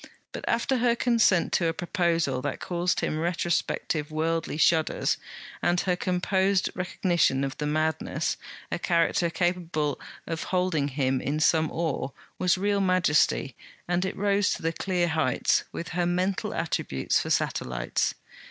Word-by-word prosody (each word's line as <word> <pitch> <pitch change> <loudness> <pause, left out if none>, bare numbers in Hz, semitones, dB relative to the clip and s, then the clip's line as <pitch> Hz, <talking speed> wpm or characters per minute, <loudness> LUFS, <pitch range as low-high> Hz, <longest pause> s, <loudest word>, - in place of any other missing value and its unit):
But, - - -7
after 255 +3 +1
her 240 -1 +3
consent 230 -7 +3
to 170 - +2
a 165 - 0
proposal 170 -6 0
that - - -3
caused 175 0 -1
him 155 - -1
retrospective 165 -2 -1
worldly 160 0 -1
shudders, 160 -1 +2 0.4
and 175 0 +2
her 180 -2 +1
composed 190 +2 +1
recognition 175 -6 +1
of 135 0 -3
the 150 - -1
madness, 155 +1 -1 0.4
a - - -1
character 170 0 +2
capable 170 -5 -1 0.2
of 165 -1 -4
holding 180 -6 0
him 130 -2 0
in 150 +3 -1
some 160 0 +3
awe 160 -5 -2 0.3
was 180 0 +3
real 200 +1 +1
majesty, 175 -8 +2 0.3
and 175 +1 +1
it 190 - -3
rose 200 -1 +2
to - - -10
the 165 0 0
clear 180 0 0
heights, 160 -5 +1
with 170 - -6
her 175 0 0
mental 185 +4 0
attributes 150 - -1
for - - -5
satellites. 60 0 0
170 Hz, 145 wpm, -27 LUFS, 155-185 Hz, 0.4 s, her